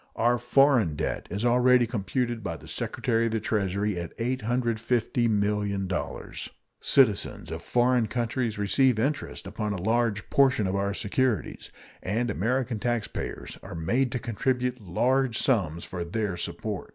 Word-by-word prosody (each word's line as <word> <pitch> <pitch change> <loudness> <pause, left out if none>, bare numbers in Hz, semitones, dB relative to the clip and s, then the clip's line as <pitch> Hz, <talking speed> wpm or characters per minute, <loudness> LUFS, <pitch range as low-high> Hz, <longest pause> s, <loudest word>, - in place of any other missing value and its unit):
Our 120 +1 +2
foreign 120 - +4
debt 80 +1 -3
is 100 +4 -2
already 125 0 +5
computed 120 +1 -2
by 85 -4 -3
the - - -14
Secretary 115 -1 -1
of 115 - -3
the 110 - +1
Treasury 100 -2 -1
at 85 -1 -7
$850,000,000; 110 -5 -1 0.3
citizens 120 -8 +2
of - - -5
foreign 125 -1 +2
countries 120 -1 -1
receive 120 +4 +3
interest 140 +6 -2
upon 105 +1 -3
a 95 - -4
large 115 -2 +1
portion 130 -6 +4
of 95 +1 -1
our 100 0 0
securities, 115 +2 -1 0.3
and 115 +4 -1
American 120 +3 -1
taxpayers 120 -1 -3
are - - -8
made 120 +11 +1
to - - 0
contribute 125 +1 -1
large 125 +6 +1
sums 90 - +1
for 90 -2 -4
their 100 +2 -2
support. - - -4
115 Hz, 140 wpm, -27 LUFS, 100-125 Hz, 0.3 s, already